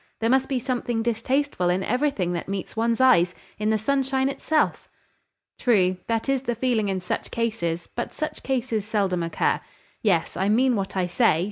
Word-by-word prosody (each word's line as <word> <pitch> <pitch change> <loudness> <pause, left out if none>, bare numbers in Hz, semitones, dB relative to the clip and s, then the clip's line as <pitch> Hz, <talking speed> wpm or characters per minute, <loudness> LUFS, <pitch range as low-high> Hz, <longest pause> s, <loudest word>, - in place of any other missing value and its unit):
There 225 +1 +1
must 265 0 +2
be 270 - 0
something 245 -2 -1
distasteful 235 -3 0
in 180 +2 +1
everything 250 -8 0
that 170 - -4
meets 195 +1 -4
one's 230 +1 +1
eyes, 180 -9 +5 0.2
in 215 0 0
the 220 - +3
sunshine 265 +3 +1
itself." 305 +2 0 0.7
"True. 185 -6 +3
That 230 +1 -1
is 270 -1 +1
the 240 -3 -2
feeling 230 -4 +1
in 190 -1 -1
such 180 - -3
cases: 175 -8 -2
but 240 - -3
such 310 - -4
cases 245 -5 -1
seldom 195 -4 0
occur. 165 0 0 0.4
Yes: 180 -7 +1
I 190 +2 0
mean 250 +3 +3
what 195 -1 -3
I 185 - +2
say. 175 -2 +3
225 Hz, 175 wpm, -25 LUFS, 190-260 Hz, 0.7 s, eyes